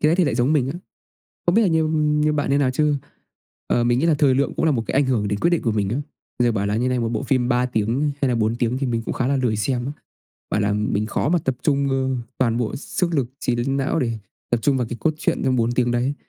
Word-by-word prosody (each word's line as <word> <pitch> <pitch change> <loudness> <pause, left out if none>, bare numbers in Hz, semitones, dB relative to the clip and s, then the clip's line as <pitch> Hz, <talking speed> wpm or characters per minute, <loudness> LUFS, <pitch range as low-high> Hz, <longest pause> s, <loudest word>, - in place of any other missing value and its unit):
cái 150 - +4
ấy 170 - +2
thì 180 - +3
lại 140 - 0
giống 125 +4 +2
mình 135 -4 +2
á. 170 - -6 0.7
Không 175 +3 +3
biết 230 - +5
là 205 - +3
như 160 -2 +2
như 150 -1 +1
bạn 145 -2 -1
như 140 - +3
nào 135 -3 +2
chứ, 150 +2 +2 0.7
ờ, 120 - +2
mình 120 +1 +2
nghĩ 165 - +1
là 165 - +4
thời 140 -3 +3
lượng 140 +1 0
cũng - - 0
là 160 - +4
một 120 -5 0
cái - - -3
ảnh 140 0 +4
hưởng 115 -6 0
đến 100 0 -2
quyết 170 - +3
định 170 - +1
của 115 - 0
mình 105 -2 0
đó. 120 +7 -1 0.5
Giờ 120 - +3
bảo 100 -3 -1
là 100 +1 0
như 125 +3 +1
này, 125 -1 0
một 115 - -1
bộ 110 -2 -2
phim 125 -2 +1
3 125 +1 +2
tiếng 125 +5 0
hay 135 - +2
là 120 - +1
4 110 +1 +1
tiếng 120 +1 0
thì 135 -1 -1
mình 115 -1 -1
cũng - - -4
khá 125 - -1
là 140 0 +1
lười 120 -4 +1
xem 120 +4 -1
á. 140 - -3 0.6
Bảo 105 - 0
là 105 0 +1
mình 105 0 0
khó 115 - -1
mà 175 - +3
tập 130 -4 -2
trung, 140 -2 +1
ơ, 130 0 0 0.2
toàn 115 -3 +1
bộ 120 -3 -2
sức 170 +4 -2
lực 135 -6 0
trí 125 -2 0
đến 135 +3 -1
não 140 +3 0
để 115 -3 -1 0.3
tập 120 - +3
trung 140 +1 +2
vào 125 -3 -1
cái 120 - -5
cốt 155 - +1
truyện - - -1
trong 130 -1 +2
4 115 0 +1
tiếng 120 0 +1
đấy. 125 +3 0
130 Hz, 300 wpm, -22 LUFS, 120-145 Hz, 0.7 s, biết